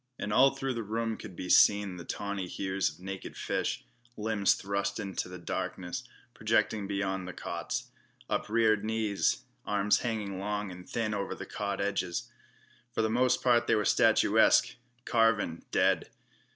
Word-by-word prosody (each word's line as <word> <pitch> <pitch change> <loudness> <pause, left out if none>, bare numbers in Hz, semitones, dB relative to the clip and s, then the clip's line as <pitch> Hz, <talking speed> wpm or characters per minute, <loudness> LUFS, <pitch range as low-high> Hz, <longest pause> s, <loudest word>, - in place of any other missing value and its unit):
And 105 - -3
all 135 +3 +5
through 135 -1 -2
the 115 - -3
room 115 +1 -2
could 95 - -10
be 90 - -6
seen 100 0 +5
the 85 - -7
tawny 100 0 -4
hues 95 0 -1
of 80 +2 -14
naked 95 +1 -7
flesh, - - -2 0.3
limbs 105 -2 +2
thrust 100 +1 -2
into 95 -3 -3
the 90 - -7
darkness, 90 +1 -4 0.3
projecting 105 -3 +1
beyond 95 -2 -2
the 90 - -6
cots; - - -4 0.4
upreared 110 -1 +2
knees, 110 -2 0 0.2
arms 105 0 +2
hanging 105 -5 -3
long 105 0 -2
and 90 0 -11
thin 115 -2 -1
over 100 -1 -3
the - - -7
cot 100 -1 -3
edges. 95 -3 -2 0.6
For 115 - 0
the 110 - +1
most 125 +2 +2
part 120 -2 +4
they - - +4
were 105 - +1
statuesque, - - +4 0.3
carven, 115 -8 +2
dead. - - +2
100 Hz, 155 wpm, -30 LUFS, 95-110 Hz, 0.6 s, all